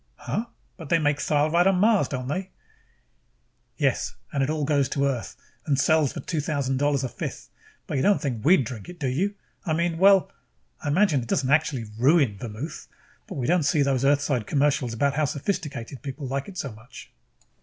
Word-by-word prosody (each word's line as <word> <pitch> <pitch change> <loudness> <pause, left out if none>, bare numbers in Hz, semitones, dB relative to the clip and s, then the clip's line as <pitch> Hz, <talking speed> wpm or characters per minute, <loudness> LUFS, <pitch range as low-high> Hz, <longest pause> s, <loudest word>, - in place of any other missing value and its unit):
"Huh? 230 - -3 0.3
But 165 -6 -9
they 170 - +4
make 145 -2 +1
thyle 150 0 +1
right 175 +2 +4
on 195 - +4
Mars, 210 +2 +3
don't 130 -2 -4
they?" 185 +7 -3 1.3
"Yes. - - 0 0.2
And 140 - 0
it 135 - +1
all 155 -2 -1
goes 140 -2 +2
to 140 -1 0
Earth 125 -8 -2 0.3
and 140 -2 +2
sells 155 -3 +2
at - - -7
2000 145 -5 -1
dollars 145 -1 +1
a - - 0
fifth. - - -6 0.4
But - - -3
you - - +1
don't 200 +7 +3
think 125 -8 -3
we'd 160 0 +5
drink 110 - -7
it, 180 - -10
do 140 - -1
you? 185 +11 0 0.3
I 165 - -1
mean 170 0 0
well, 195 0 +5 0.5
I - - -4
imagine 155 -2 +3
it 120 - -8
doesn't 135 +2 0
absolutely 140 -7 +1
ruin 135 - +3
vermouth. 120 +7 -7 0.4
But - - -7
we 130 - -2
don't 175 +4 +3
see 150 -1 +2
those 135 -2 +1
Earthside 140 -4 +1
commercials 140 -5 +1
about 140 +4 +1
how 150 +2 +1
sophisticated 145 - -4
people 140 0 -6
like 135 +1 -3
it 195 -2 -10
so 140 - -3
much." 110 +3 -13
145 Hz, 195 wpm, -25 LUFS, 130-165 Hz, 1.3 s, we'd